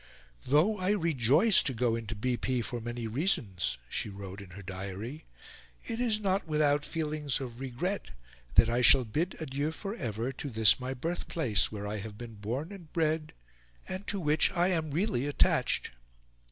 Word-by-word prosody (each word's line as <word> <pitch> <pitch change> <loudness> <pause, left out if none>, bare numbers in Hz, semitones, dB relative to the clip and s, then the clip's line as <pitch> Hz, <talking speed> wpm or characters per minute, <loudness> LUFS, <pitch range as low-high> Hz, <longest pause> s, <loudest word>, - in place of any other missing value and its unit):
"Though 165 +10 +3
I 185 +2 +2
rejoice 165 - +4
to 130 - 0
go 115 0 +1
into 115 -1 -4
B. 125 +4 0
P. 125 0 -1
for 120 0 -4
many 120 0 -4
reasons," 110 - 0
she 105 - -2
wrote 100 0 -8
in 100 - -11
her 100 +3 -10
diary, 100 +8 -6 0.6
"it 230 +1 -3
is 225 -3 +2
not 195 -3 0
without 150 -2 +2
feelings 150 -3 -2
of 125 -3 -7
regret 135 +10 -3 0.5
that 110 +3 +7
I 120 +1 +1
shall 125 +2 +7
bid 160 - -1
adieu 145 0 -2
for 195 +5 -5
ever 120 - -3
to 140 +2 -6
this 110 -1 +5
my 130 +1 -4
birthplace, 160 - 0
where 105 -1 -5
I 105 +1 -3
have 105 0 -7
been 120 -1 -8
born 120 - -4
and 180 -6 -11
bred, 160 -1 0 0.5
and 185 +2 -5
to 200 - -2
which 155 -2 +3
I 175 0 +2
am 160 -4 0
really 150 - 0
attached!" 145 - +2
135 Hz, 175 wpm, -30 LUFS, 115-165 Hz, 0.6 s, that